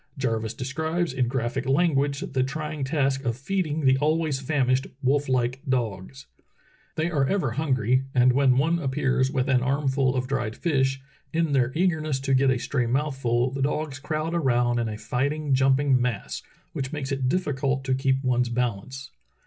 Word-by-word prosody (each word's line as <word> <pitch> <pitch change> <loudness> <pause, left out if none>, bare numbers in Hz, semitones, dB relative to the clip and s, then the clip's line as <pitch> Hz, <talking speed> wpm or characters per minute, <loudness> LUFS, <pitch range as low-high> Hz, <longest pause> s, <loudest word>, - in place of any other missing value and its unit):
Jarvis 115 -4 -2
describes 160 +5 -2
in 130 -2 0
graphic 125 +1 -2
language 140 -1 +2
the 135 -9 -1
trying 150 +2 -3
task 135 -1 0
of 120 -2 -1
feeding 155 -1 -2
the 130 0 +4
always 155 -1 +1
famished, 130 -2 +1 0.2
wolf 140 +2 +1
like 130 0 0
dogs: 120 +1 -2 0.7
"They 160 +2 -1
are 140 -4 +1
ever 175 -9 0
hungry, 130 -2 +1
and 125 0 +5
when 130 -1 +3
one 165 +5 +2
appears 130 -2 +1
with 130 -1 -1
an 130 -2 +3
armful 135 0 +1
of 130 0 0
dried 120 -4 -2
fish, 135 -5 0 0.3
in 165 -2 0
their 130 -3 +2
eagerness 155 -5 0
to 135 0 0
get 135 +1 +4
a 130 - +2
stray 125 0 -1
mouthful 130 -2 0
the 135 0 -4
dogs 145 0 -2
crowd 155 +2 -3
around 120 -7 +2
in 115 -1 -1
a 105 - -5
fighting, 140 +5 -1
jumping 135 0 +3
mass, 120 -5 -2 0.3
which 135 -1 -4
makes 145 -3 -4
it 135 -2 0
difficult 140 -5 0
to 130 0 0
keep 135 +1 +1
one's 125 -1 +1
balance. 125 +3 -3
135 Hz, 170 wpm, -25 LUFS, 125-145 Hz, 0.7 s, and